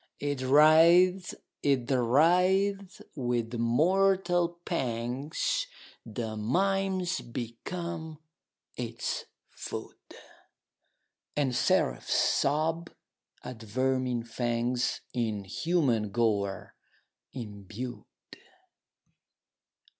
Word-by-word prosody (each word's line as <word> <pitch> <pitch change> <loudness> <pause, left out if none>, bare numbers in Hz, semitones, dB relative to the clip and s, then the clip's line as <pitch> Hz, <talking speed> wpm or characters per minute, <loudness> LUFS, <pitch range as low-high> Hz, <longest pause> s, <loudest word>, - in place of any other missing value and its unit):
It 145 -2 -2
writhes 165 +7 +5 0.3
it 135 -3 +1
writhes! 180 +10 +2
with 120 -4 -2
mortal 175 +8 +2
pangs 130 - -2 0.4
The 110 -1 -5
mimes 185 - 0
become 160 +8 -6 0.6
its - - -4 0.3
food, - - -7 0.2
30 - - -13 1.2
And 135 -4 0
seraphs - - +1
sob 160 +4 +1 0.5
at 125 -3 -8
vermin 130 +2 -1
fangs 120 +1 -1
In 110 -5 -1
human 120 - 0
gore 100 -3 -1 0.6
imbued. 110 +1 -7
130 Hz, 70 wpm, -29 LUFS, 115-175 Hz, 1.2 s, writhes